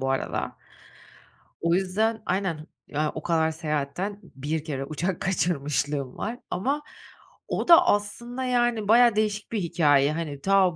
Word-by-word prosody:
bu 135 0 -1
arada. 135 - -2 1.1
O 170 +1 +2
yüzden 215 +4 0
Aynen. 180 -5 -2 0.2
Ya, 150 +1 -1
o 160 - -5
kadar 160 -1 +2
seyahatten 155 +6 -3
1 150 0 -4
kere 135 -4 -3
uçak 165 +5 -3
kaçırmışlığım 145 -6 -1
var. 235 +4 -4
Ama 275 +11 -1 0.6
o - - -2
da 335 -1 +8
aslında, 240 +5 -1
yani, 240 -4 +1
bayağı 235 +1 +6
değişik 210 -1 -1
bir 215 -4 -1
hikâye, 145 -4 +3
hani. 150 -4 -4
Ta 190 -2 +3
180 Hz, 140 wpm, -26 LUFS, 150-215 Hz, 1.1 s, da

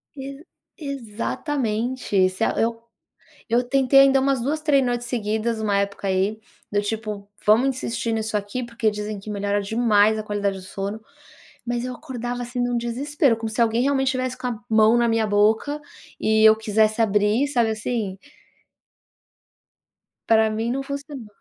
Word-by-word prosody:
Ex 275 +1 -8 0.4
exatamente, 240 - -1
se 185 +4 -4
a - - +2
eu 230 0 -1 0.7
eu 240 +2 +3
tentei 270 +2 +4
ainda 270 0 +5
umas 270 -2 +1
2, 300 +5 -1
3 280 -4 +3
noites 240 0 -2
seguidas 220 -1 -1
uma 205 -2 +1
época 200 0 -2
aí, 195 +3 0 0.3
do 205 0 +1
tipo: 210 -1 -4 0.2
"Vamos 225 +6 +5
insistir 235 -3 -3
nisso 220 -1 -1
aqui, 205 +5 -4
porque 235 -2 -1
dizem 210 0 -5
que 200 - -10
melhora 205 0 -1
demais 220 0 +3
a 215 - -4
qualidade 205 -2 -2
do - - -9
sono", 200 +3 -5 0.6
mas 240 0 -2
eu 255 - -4
acordava, 245 0 -5
assim, 245 +1 -5
em 245 - +1
um 245 - 0
desespero 260 +2 0
como 225 -1 -4
se 220 - -1
alguém 230 +1 +2
realmente 270 -1 +1
estivesse 255 0 -1
com 255 - -4
a 235 -3 -4
mão 220 +1 +5
na 240 0 +3
minha 225 -1 +2
boca 215 +8 +2 0.4
e 220 0 +2
eu 220 - +7
quisesse 220 0 +1
abrir, 210 +5 +2
sabe, 240 -5 +1
assim? 215 -3 -3 2.1
Para 220 -1 +4
mim 225 +2 -2
não 270 +2 -2
funcionou. 280 -3 -7
225 Hz, 165 wpm, -23 LUFS, 210-255 Hz, 2.1 s, eu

